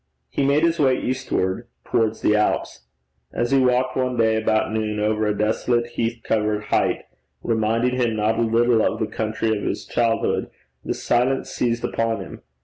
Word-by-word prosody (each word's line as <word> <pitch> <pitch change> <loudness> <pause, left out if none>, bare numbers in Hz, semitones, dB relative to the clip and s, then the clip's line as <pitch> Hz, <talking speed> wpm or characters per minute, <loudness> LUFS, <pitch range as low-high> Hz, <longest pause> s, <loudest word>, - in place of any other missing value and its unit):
He - - 0
made 140 +3 +3
his 170 0 +2
way 130 -3 +3
eastward 120 -5 -2 0.2
towards 110 -1 0
the 105 - +3
Alps. 105 - -1 0.4
As 120 +1 -1
he 135 - +5
walked 125 0 +2
one 125 -1 -1
day 110 -1 +3
about 110 0 +1
noon 105 -1 -1
over 105 0 +1
a 105 -1 0
desolate 120 +3 0
heath 115 0 -2
covered 105 -1 0
height, - - +1 0.4
reminding 115 +2 +1
him 120 -3 +1
not 110 +1 +1
a - - +2
little 115 0 +3
of - - 0
the 110 - +1
country 110 +1 -1
of 105 - -4
his - - -3
childhood, 115 -1 0 0.3
the - - -2
silence 125 +2 0
seized 120 -1 -1
upon 115 0 -1
him. - - -9
115 Hz, 175 wpm, -22 LUFS, 110-125 Hz, 0.4 s, he